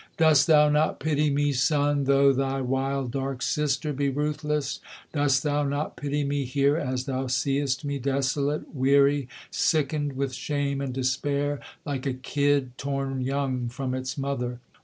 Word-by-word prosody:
'Dost 155 -3 +5
thou 150 -2 +6
not 150 +1 +1
pity 150 0 +1
me, 145 0 +1
Sun, 145 +1 +2
though 140 0 +5
thy 135 0 -1
wild 135 0 -1
dark 135 0 -3
sister 150 0 0
be 140 +1 0
ruthless; 150 0 -2 0.3
Dost 145 -3 +2
thou 145 -1 +1
not 145 +2 -2
pity 145 0 -2
me 140 0 -1
here, 140 +3 +2
as 130 -5 -2
thou 130 -1 -2
seest 135 +2 0
me 140 -1 -2
desolate, 140 +2 -1
weary, 140 0 +3 0.2
Sickened 145 -2 +1
with 135 0 -2
shame 140 +1 -2
and 135 -2 -3
despair, 140 +3 -1 0.3
like 140 -2 -3
a 135 - 0
kid 140 -1 0
torn 135 -1 -2
young 130 -2 -1
from 130 +1 -4
its 130 +1 -4
mother? 125 -3 -3
140 Hz, 155 wpm, -26 LUFS, 135-145 Hz, 0.3 s, thou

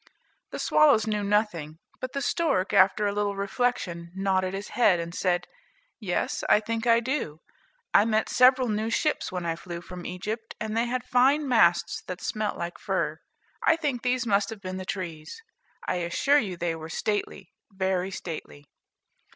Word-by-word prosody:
The - - -6
swallows 285 -8 +4
knew 210 -2 -1
nothing, 200 -7 0 0.2
but 255 - -5
the 275 -1 -2
stork, 280 - 0
after 195 +3 +4
a 205 - +1
little 205 -1 -1
reflection, 195 -4 -2
nodded 190 -1 0
his 200 +1 -6
head, 205 -8 +3
and 170 0 -5
said, 175 -1 0 0.5
"Yes, 190 -6 -2
I - - +6
think 225 +2 -3
I 230 0 +5
do. 240 - -2 0.6
I 205 - +6
met 220 -1 +1
several 255 0 +5
new 215 0 -1
ships 300 +6 0
when 180 -2 -4
I 165 -1 -1
flew 170 0 -7
from 180 0 -8
Egypt, 215 +5 -5
and 215 0 -3
they 230 +1 +2
had 250 0 -2
fine 265 +4 +3
masts 175 -9 +3
that 180 0 -5
smelt 215 -1 -2
like 170 0 -5
fir. - - -1 0.4
I 325 - +4
think 290 -7 -2
these 250 0 0
must 200 -2 +2
have 225 - -7
been 185 -1 -5
the 185 - -6
trees; 170 - -5 0.5
I - - 0
assure 180 +12 +2
you 190 -8 -4
they 170 -1 -1
were 160 0 -8
stately, 200 0 -3 0.2
very 190 -1 -1
stately." 160 -5 -7
200 Hz, 175 wpm, -27 LUFS, 180-235 Hz, 0.6 s, I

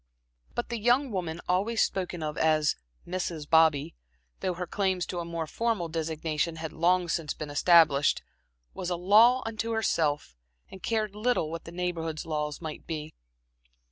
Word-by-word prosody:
But 240 - -2
the 235 -1 -3
young 245 +4 +3
woman 175 -4 -3
always 205 +6 +1
spoken 180 -3 0
of 150 -1 -3
as 155 -2 +2 0.3
"Mrs. 170 -4 -3
Bobby" 160 -3 +4 0.5
though 185 -1 -1
her 180 +1 -3
claims 190 -1 0
to 180 - -4
a 170 - -4
more 170 -1 -3
formal 215 -1 -1
designation 160 0 -2
had 160 -1 -6
long 175 +2 +2
since 165 -2 -2
been 150 -1 -6
established, 150 -2 +4 0.5
was 180 - -4
a 175 - 0
law 220 +8 +5
unto 225 +1 -3
herself 155 - 0 0.4
and 190 - -10
cared 215 0 -1
little 210 -7 0
what 165 - -6
the 165 - -8
Neighborhood's 170 -3 -3
laws 150 -2 -2
might 160 -2 -7
be. 155 -1 -5
170 Hz, 160 wpm, -28 LUFS, 160-195 Hz, 0.5 s, law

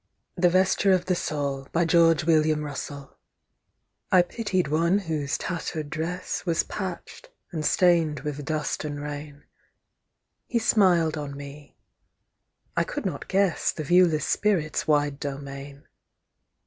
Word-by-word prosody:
THE 180 0 +4
VESTURE 190 +2 +3
OF 185 - +1
THE 185 - +1
SOUL 140 -5 -3 2.4
I 185 - +7
pitied 185 - -1
one 165 +6 +2
whose 155 -7 -2
tattered 160 -4 -4
dress 170 +3 -3
Was 170 -2 +1
patched, 185 -4 -7 0.2
and 155 -3 -3
stained 165 -3 +3
with 145 -1 -4
dust 155 0 -2
and 145 -1 -4
rain; 145 0 -7 1.0
He 240 - 0
smiled 175 -8 +3
on 140 -1 -6
me; 145 +1 -11 1.0
I - - +3
could - - -5
not - - -4
guess 190 -3 +1
The 155 - -5
viewless 165 -2 +4
spirit's 175 -8 0
wide 145 -2 +2
domain. 140 0 -7
155 Hz, 115 wpm, -26 LUFS, 145-180 Hz, 2.4 s, I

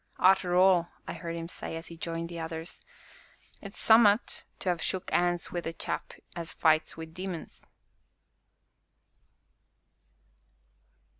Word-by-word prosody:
"Arter 185 -1 +4
all," 180 -2 +5 0.2
I - - -3
heard 170 -1 -5
him 165 - -5
say, 170 - -7
as 165 - -6
he 170 - -9
joined 165 0 -3
the 170 0 -7
others, 160 0 -6 0.8
"'tis 200 0 -9
summat 220 -1 +4
to 180 - +1
ha' 165 - -11
shook 185 -1 -2
'ands 175 -1 +1
wi' 175 - -2
a 165 - -4
chap - - -4 0.2
as 170 -1 -4
fights 160 -1 +2
wi' 160 - -5
demons!" 175 +1 -7
170 Hz, 130 wpm, -29 LUFS, 165-185 Hz, 0.8 s, all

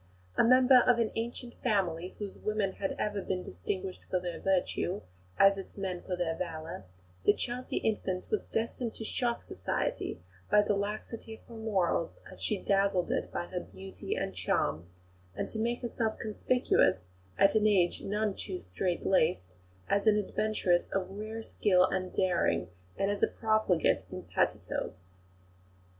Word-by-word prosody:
A - - +5
member 255 +1 +7
of 245 -1 +4
an 230 -2 +1
ancient 235 +1 -4
family, 185 -6 0
whose 205 -2 -5
women 215 -2 0
had 195 0 -3
ever 205 -1 -1
been 185 -1 -2
distinguished 185 - -4
for 185 - 0
their 175 -1 -4
virtue 190 0 0 0.4
as 195 0 +6
its 195 - -9
men 185 -3 -3
for 185 - -3
their 175 -2 0
valour, 160 - -5 0.4
the 205 - +6
Chelsea 250 +1 -3
infant 190 -4 -1
was 430 - +2
destined 230 +1 -2
to - - -5
shock 235 +2 -1
Society - - -2 0.3
by 210 - +6
the 205 - +1
laxity 215 +2 -4
of - - -20
her 235 - -14
morals 200 -7 0
as - - -8
she 210 - +1
dazzled 195 -2 +2
it - - -1
by - - -2
her 180 0 -4
beauty 190 +2 -6
and - - -2
charm, 75 +3 0 0.5
and - - -3
to 220 - -2
make 235 +2 -1
herself 230 -2 -1
conspicuous, 220 - +2 0.4
in - - +3
an 215 0 +4
age 185 -4 +3
none 210 +1 0
too 190 -1 -4
strait 135 - -2
laced, 155 - +2 0.3
as 200 +2 +1
an 210 -1 +6
adventuress 205 -3 +1
of 190 -1 -1
rare 215 +3 -5
skill 185 -4 +3
and 185 -1 -2
daring, 175 - +1 0.3
and 195 +1 +1
as 205 - -3
a - - +5
profligate 215 -7 +2
in - - -6
petticoats. 90 0 -2
195 Hz, 160 wpm, -31 LUFS, 180-220 Hz, 0.5 s, member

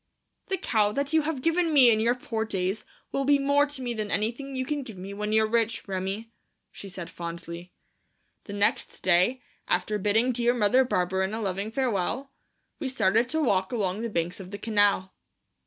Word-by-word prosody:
"The 385 - 0
cow 210 - +2
that 280 +4 -2
you 320 - +5
have 295 -4 -3
given 330 0 +2
me 260 -5 +7
in 215 - +3
your 235 +2 +2
poor 225 -3 -3
days 195 -1 -2 0.3
will 275 - 0
be 285 +1 +4
more 285 +1 +3
to 285 -2 -5
me 240 -1 -2
than 215 -2 -3
anything 240 +7 -1
you 260 0 -1
can 295 +1 -2
give 225 -7 -9
me 190 +2 -7
when 210 +1 -3
you're 220 0 +4
rich, 225 0 0
Remi," 195 +4 -3 0.4
she 200 - -9
said 180 -2 -7
fondly. 170 +1 -7 0.7
The 205 - -7
next 205 +4 0
day, 190 +8 +3 0.2
after 185 +4 0
bidding 220 +5 +2
dear 240 0 +1
Mother 240 +3 +4
Barberin 190 -3 0
a - - -3
loving 200 0 -2
farewell, 250 +2 -1 0.5
we 270 - -2
started 230 -1 +2
to 315 +2 0
walk 190 -7 +1
along 205 -3 -1
the 235 - -2
banks 175 -2 -2
of 185 -2 -8
the 200 - -6
canal. 205 -3 +2
220 Hz, 190 wpm, -27 LUFS, 195-255 Hz, 0.7 s, me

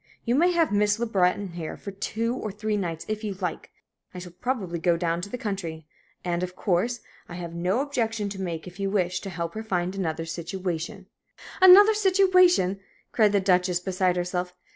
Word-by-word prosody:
You 235 - +1
may 340 +7 +4
have 335 -6 +2
Miss 205 0 +2
Le 235 - -1
Breton 195 -2 +1
here 170 -2 -6
for 200 - -7
two 225 +4 -2
or 215 -5 -4
three 210 +1 -2
nights 170 -5 -3
if 215 0 -3
you 205 -2 -3
like 180 -3 -4 0.5
I - - -6
shall 180 0 -8
probably 185 -3 -3
go 170 0 +2
down 170 0 -1
to 200 - -6
the 250 - -4
country 175 -8 -5 0.4
and, 175 -1 -1
of 180 0 -4
course, 210 +6 0 0.3
I 175 - -7
have 170 -1 -6
no 180 +8 0
objection 225 -7 -1
to 195 -1 -6
make 170 -3 -4
if 180 +1 -11
you 195 0 -1
wish 185 -3 0
to 195 - -7
help 170 -2 -4
her 220 - -5
find 185 -4 -2
another 165 -4 -2
situation 175 +3 -4 0.3
" - - -15
"Another 395 +4 +9
situation!" 370 - +4 0.3
cried 215 -3 +4
the 200 - +3
Duchess, 180 -2 +2
beside 185 0 0
herself. 180 0 -3
190 Hz, 200 wpm, -26 LUFS, 175-220 Hz, 0.5 s, Another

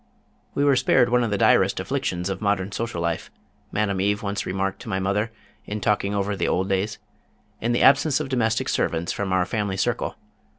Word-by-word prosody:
"We 140 - +1
were 140 -2 +5
spared 120 -1 +3
one 125 0 +3
of 115 - 0
the 100 - 0
direst - - +4
afflictions 90 0 -2
of 95 0 -3
modern 100 -2 0
social 110 -5 -3
life," 85 -1 -2 0.4
Madame 100 -3 0
Eve 105 +3 0
once 100 0 -2
remarked 95 +1 -2
to - - -8
my 95 - -1
mother, 100 +4 0 0.4
in 105 +1 -3
talking 100 0 0
over 100 0 0
the - - -1
old 95 +1 +1
days, 100 +2 -1 0.6
"in 115 - -1
the 120 - +2
absence 140 +1 +5
of 150 - -3
domestic 115 -4 0
servants 85 0 0
from 100 -2 -3
our 95 -1 +2
family 100 -1 -2
circle. - - -1
100 Hz, 200 wpm, -24 LUFS, 95-115 Hz, 0.6 s, were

